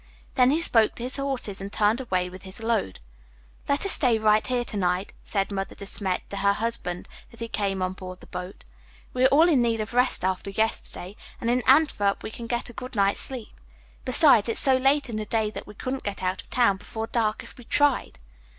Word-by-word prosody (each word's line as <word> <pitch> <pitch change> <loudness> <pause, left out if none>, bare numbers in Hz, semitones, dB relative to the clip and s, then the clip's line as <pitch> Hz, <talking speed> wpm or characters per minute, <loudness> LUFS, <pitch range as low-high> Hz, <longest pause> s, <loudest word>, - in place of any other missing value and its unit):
Then 255 -1 +4
he 300 +4 +2
spoke 225 -10 +4
to 235 - -6
his 255 +3 -2
horses 265 -8 -3
and 195 +1 -6
turned 215 +5 +2
away 185 -7 -1
with 185 +1 -11
his 190 +4 -9
load. 225 - -1 0.7
"Let 285 +6 +1
us 395 - +1
stay 245 -5 +4
right 215 0 +3
here 250 -1 0
to 225 - -6
night," 185 0 -1
said 195 -1 -2
Mother 195 -1 -4
De 200 - -7
Smet 190 -2 -1
to 200 - -4
her 200 +1 +3
husband 210 -5 -2 0.2
as 230 - -13
he 230 - -3
came 195 -4 -2
on 185 0 -2
board 185 -1 -9
the - - -15
boat. 180 +2 -8 0.5
"We 255 0 +2
are - - +9
all 305 +5 +5
in 295 -8 +4
need 230 -1 +1
of 215 +2 -4
rest 250 -6 +2
after 190 +1 -2
yesterday, 200 -2 -3 0.2
and 235 - 0
in 250 +1 +2
Antwerp 260 -8 +3
we - - -5
can 230 +1 -8
get 240 0 -2
a 240 - -11
good 255 +1 -8
night's 200 -1 +2
sleep. 255 -4 -2 0.5
Besides, 255 -4 +4
it - - +1
is - - +3
so 265 -1 +5
late 270 +2 +2
in 225 -3 -4
the 215 - -3
day 220 -1 -1
that - - -8
we 210 - -12
couldn't 260 +5 -4
get 200 -2 -5
out 185 +1 -1
of - - -24
town 235 -6 +3
before 220 +2 -6
dark 220 -2 -1
if - - -13
we - - -11
tried." 290 +3 +1
225 Hz, 230 wpm, -25 LUFS, 200-250 Hz, 0.7 s, are